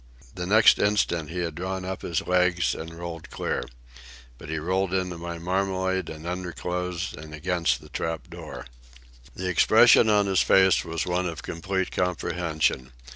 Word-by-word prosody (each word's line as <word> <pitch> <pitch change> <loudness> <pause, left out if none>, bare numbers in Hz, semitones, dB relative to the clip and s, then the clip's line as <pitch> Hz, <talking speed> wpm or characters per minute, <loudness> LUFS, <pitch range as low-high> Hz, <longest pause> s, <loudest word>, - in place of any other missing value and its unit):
The 90 0 -5
next 110 +3 +6
instant 90 -6 +1
he 90 +2 -3
had 85 -2 -2
drawn 95 +3 -4
up 95 0 -4
his 85 -3 -2
legs 90 -2 +2
and 80 +1 -7
rolled 85 -2 -7
clear. - - -2 0.8
But - - -10
he 80 - -2
rolled 95 +4 0
into 90 -2 -2
my 85 0 -5
marmalade 95 +1 -1
and 80 +1 -9
underclothes 90 +1 -3
and 75 0 -9
against 85 +2 0
the - - -14
trap 80 -2 -4
door. - - -9 0.7
The 95 - -4
expression 90 +4 +6
on 105 -1 +4
his 95 -2 +2
face 95 -1 +4
was 80 0 -3
one 90 0 0
of 85 -2 -6
complete 95 +3 -3
comprehension. 80 -7 -1
90 Hz, 160 wpm, -26 LUFS, 85-95 Hz, 0.8 s, next